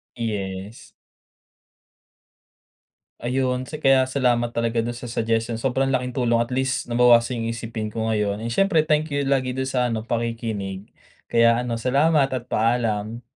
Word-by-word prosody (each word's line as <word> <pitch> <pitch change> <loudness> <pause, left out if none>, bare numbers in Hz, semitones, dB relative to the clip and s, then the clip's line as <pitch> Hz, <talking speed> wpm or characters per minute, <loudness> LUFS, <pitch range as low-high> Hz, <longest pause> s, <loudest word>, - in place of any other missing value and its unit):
Yes. 100 -2 -5 2.3
Ayun, 125 +1 -1
ts - - -7
kaya 135 -1 +5
salamat 120 -3 +1
talaga 115 0 0
do'n 120 +1 -2
sa 120 0 -8
suggestions. 115 0 -1
Sobrang 135 +2 0
laking 125 -1 -1
tulong, 120 -2 +2
at 115 +1 -1
least 130 +2 -1
nabawasan 120 0 +4
yung 115 - -1
isipin 115 -2 -5
ko 110 0 -3
ngayon. 105 -2 0
Eh, 115 - -4
siyempre, 165 -1 +3
thank 155 0 +1
you 145 0 0
lagi 130 -2 +1
do'n 130 +1 -3
sa 125 -2 0
ano 115 - -1
pakikinig. 115 -5 -3 0.4
Kaya 115 0 +4
ano 120 -1 -2
salamat 140 +4 +2
at 125 -2 -4
paalam. 115 -1 0
120 Hz, 150 wpm, -23 LUFS, 115-130 Hz, 2.3 s, kaya